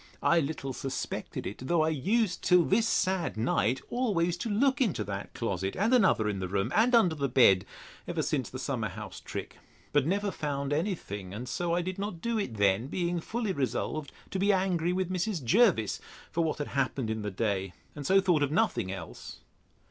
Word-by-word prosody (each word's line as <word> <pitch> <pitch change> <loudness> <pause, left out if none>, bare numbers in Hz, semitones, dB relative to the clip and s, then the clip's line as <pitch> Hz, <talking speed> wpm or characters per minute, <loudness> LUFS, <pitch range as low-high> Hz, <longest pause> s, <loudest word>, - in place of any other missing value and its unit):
I 170 - +5
little 140 -3 -3
suspected 135 +1 -4
it; 100 - -5
though 170 0 +3
I 160 - +2
used, 185 - 0
till 180 -1 +5
this 225 +4 +3
sad 185 - 0
night, 115 +1 +1
always 190 -9 +1
to 225 - -3
look 260 +5 +2
into 190 - +1
that 100 0 -6
closet 95 -4 -2
and 220 +6 +2
another 185 - +4
in 100 -2 -1
the 95 - -2
room, 100 +1 -1
and 235 +3 +4
under 185 -8 +5
the 140 -3 -1
bed, 100 -7 +5 0.4
ever - - -1
since - - -1
the - - -7
summer - - -2
house - - -8
trick; - - -7 0.4
but 145 -1 +3
never 200 +3 0
found 140 -3 -2
any 185 +6 0
thing; 100 - -7
and 120 +4 -6
so 170 +7 -1
I 175 - 0
did 185 +2 -4
not 200 -4 -4
do 230 +4 -1
it 160 - -3
then, 100 +3 +2
being 175 +2 -1
fully 220 +3 -2
resolved 140 +2 -2 0.2
to 190 - -2
be 200 +2 +4
angry 185 -3 +1
with 185 0 -1
Mrs. 185 -3 -1
Jervis 155 - +3 0.3
for 170 - +1
what 160 - -1
had 145 - -4
happened 130 -4 -1
in 110 0 -2
the 105 - -2
day, 95 -2 -1 0.2
and 145 - -6
so 190 +7 +5
thought 180 -5 +2
of 145 - +2
nothing 170 - +1
else. 95 -4 -8
160 Hz, 200 wpm, -29 LUFS, 115-190 Hz, 0.4 s, I